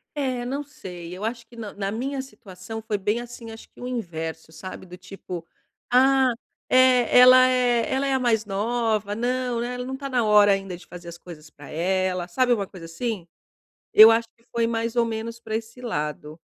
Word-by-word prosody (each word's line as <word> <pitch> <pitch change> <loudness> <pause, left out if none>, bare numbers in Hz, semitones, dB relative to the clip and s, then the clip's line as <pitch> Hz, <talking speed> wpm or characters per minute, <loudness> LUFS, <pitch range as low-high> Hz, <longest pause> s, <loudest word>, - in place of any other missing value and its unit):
É, 260 -4 -2
não 275 +4 -3
sei, 180 - -9
eu 190 - -8
acho 235 +1 -4
que 235 - -17
na 220 -3 -7
na 195 -1 -3
minha 265 +5 -3
situação 220 -4 -9
foi 215 -1 -2
bem, 210 +3 -1
assim, 240 -1 -9
acho 225 - -12
que - - -21
o 250 - -6
inverso, 165 -9 -5
sabe, 185 +4 -9
do 180 0 -11
tipo: 180 -2 -8 0.5
"Ah, 265 +1 +5 0.4
eh, 255 -2 +5
ela 255 +1 +9
é 245 -2 +2
ela 275 +1 0
é 270 - +1
a 265 - +2
mais 225 -4 +1
nova. 215 0 -1
Não, 245 +1 -1
né, 245 +1 -3
ela 250 0 -5
não 265 +1 -4
tá 275 +1 -6
na 250 -3 +1
hora 210 -1 +6
ainda 195 -2 -3
de 175 - -14
fazer 175 -1 -11
as 170 0 -8
coisas 165 -3 -12
pra 145 -2 -14
ela", 185 +1 -1
sabe 250 +7 +1
uma 205 -4 -1
coisa 180 -4 -11
assim? 185 +2 -4 0.7
Eu 220 +1 +10
acho 230 0 +1
que 230 - -30
foi 230 -1 +1
mais 230 0 -2
ou 235 -1 +3
menos 230 +1 -5
pra 220 -2 -5
esse 225 +2 -6
lado. 150 -6 -4
225 Hz, 205 wpm, -24 LUFS, 185-245 Hz, 0.7 s, Eu